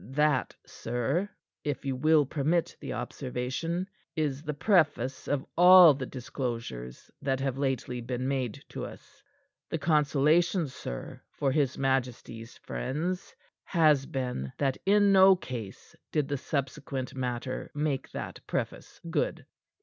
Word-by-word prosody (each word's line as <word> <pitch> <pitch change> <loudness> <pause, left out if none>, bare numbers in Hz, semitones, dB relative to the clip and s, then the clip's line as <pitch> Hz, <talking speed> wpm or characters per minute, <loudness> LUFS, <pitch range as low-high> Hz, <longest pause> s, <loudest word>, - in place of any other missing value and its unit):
"That, 150 -2 +2
sir 135 - -2 0.3
if 145 -2 -3
you 135 -1 -1
will 155 +2 +4
permit 155 +5 0
the - - -6
observation 135 +8 -3 0.3
is 145 -4 -1
the 150 -2 -4
preface 145 - +2
of 140 -2 0
all 180 -2 +9
the 130 -2 -5
disclosures 115 - -5
that 135 -1 0
have 135 -1 -2
lately 130 -3 -1
been 125 +2 -3
made 135 0 -2
to - - -6
us. 280 0 -11 0.5
The 165 - -1
consolation, 155 +3 +3
sir, - - -7
for 135 - -1
his 140 -2 +1
majesty's 125 -3 -2
friends, 155 - -3 0.3
has 150 -6 +3
been 125 - -3
that 135 -2 0
in 205 0 +5
no 190 0 +8
case 120 - -8 0.2
did 150 -3 +1
the 145 - 0
subsequent 135 -1 -3
matter 130 0 -3
make 145 -2 -1
that - - -6
preface - - -4
good." - - -1
140 Hz, 130 wpm, -29 LUFS, 125-155 Hz, 0.5 s, all